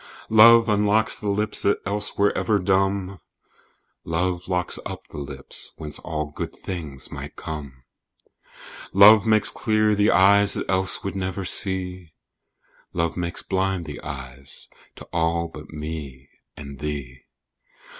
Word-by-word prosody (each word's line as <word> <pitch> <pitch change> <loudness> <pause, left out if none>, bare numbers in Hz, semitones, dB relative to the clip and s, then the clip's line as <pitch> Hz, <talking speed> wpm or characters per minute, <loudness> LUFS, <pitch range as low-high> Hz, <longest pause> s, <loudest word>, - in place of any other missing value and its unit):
Love 115 +1 +8
unlocks 105 +1 +2
the 105 - -3
lips 105 +1 -1
that 100 - +2
else 105 +2 -3
were 100 0 +2
ever 110 -2 +1
dumb: 95 0 0 0.8
"Love 90 +2 -2
locks 90 -1 0
up - - -8
the - - -8
lips 70 -1 -7
whence 75 -2 -7
all 75 -2 -4 0.3
things 80 -8 -6
good - - -13
might - - -8
come." 70 -5 -8 1.1
Love 105 +2 +8
makes 110 -1 +4
clear 110 -1 +1
the 105 +1 +3
eyes 100 +2 +5
that - - -4
else 95 0 0
would 100 - -4
never 95 0 -3
see: 90 -3 -2 0.8
"Love 85 -1 -1
makes 85 -1 -3
blind 95 -2 -1
the 75 -2 -8
eyes 70 -1 -8 0.3
to - - -11
all 85 0 0
but 75 -1 -11
me 75 -4 -7 0.3
and 70 -2 -9
thee." 70 -4 -5
90 Hz, 135 wpm, -23 LUFS, 75-100 Hz, 1.1 s, Love